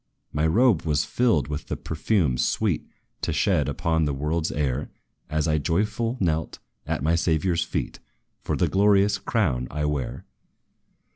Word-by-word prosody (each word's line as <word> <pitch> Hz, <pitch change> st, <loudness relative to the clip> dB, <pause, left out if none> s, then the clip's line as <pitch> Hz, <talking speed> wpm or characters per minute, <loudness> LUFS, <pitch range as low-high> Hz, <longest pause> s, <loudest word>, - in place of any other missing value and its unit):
"My 75 Hz, +2 st, +2 dB
robe 110 Hz, +1 st, +4 dB
was 75 Hz, -2 st, 0 dB
filled 115 Hz, -, +2 dB
with 75 Hz, 0 st, -5 dB
the -, -, -3 dB
perfume 80 Hz, -, 0 dB
sweet 60 Hz, -, 0 dB, 0.3 s
To -, -, -1 dB
shed 70 Hz, -2 st, +2 dB
upon 80 Hz, +1 st, 0 dB
this 70 Hz, -2 st, -1 dB
world's 80 Hz, +4 st, -1 dB
air, 70 Hz, -2 st, -1 dB, 0.4 s
As 75 Hz, 0 st, 0 dB
I 80 Hz, -1 st, +2 dB
joyful 105 Hz, -, 0 dB
knelt, 80 Hz, -4 st, -1 dB, 0.3 s
at 65 Hz, -, -2 dB
my 80 Hz, +2 st, +2 dB
Saviour's 85 Hz, +1 st, +1 dB
feet, -, -, -4 dB, 0.4 s
For -, -, -2 dB
the -, -, +2 dB
glorious 100 Hz, +1 st, +3 dB
crown 75 Hz, -, 0 dB
I 75 Hz, +1 st, -2 dB
wear. 75 Hz, -4 st, -3 dB
80 Hz, 150 wpm, -25 LUFS, 75-95 Hz, 0.4 s, robe